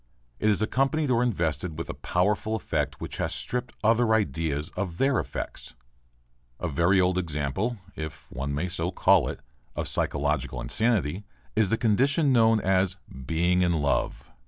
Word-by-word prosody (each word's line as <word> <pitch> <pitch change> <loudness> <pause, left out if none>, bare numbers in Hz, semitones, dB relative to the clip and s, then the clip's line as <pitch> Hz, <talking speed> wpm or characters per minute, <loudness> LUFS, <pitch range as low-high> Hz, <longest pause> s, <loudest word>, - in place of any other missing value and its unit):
It 110 - +2
is 105 0 +2
accompanied 135 +5 +1
or 120 -1 +3
invested 85 - -1
with 85 - -4
a - - -4
powerful 105 +4 0
affect 110 - -2
which - - -6
has - - -1
stripped 125 0 -3
other 115 +1 +4
ideas 80 -6 -1
of 90 -4 -4
their 135 +2 +2
affects. - - -5 0.8
A 90 - -2
very 85 +5 +3
old 90 0 +2
example 80 - -2 0.2
if 80 -1 -7
one 70 +3 -3
may 75 +6 -1
so 85 -1 -2
call 90 - +4
it - - -6 0.3
of - - -2
physiological 60 - -1
insanity 100 - 0 0.3
is 110 -3 +3
the 115 - +2
condition 135 +6 +3
known 115 -2 +5
as 95 -1 +1 0.3
"being 85 +3 +2
in 90 -1 +3
love." 75 -3 0
95 Hz, 160 wpm, -27 LUFS, 80-115 Hz, 0.8 s, known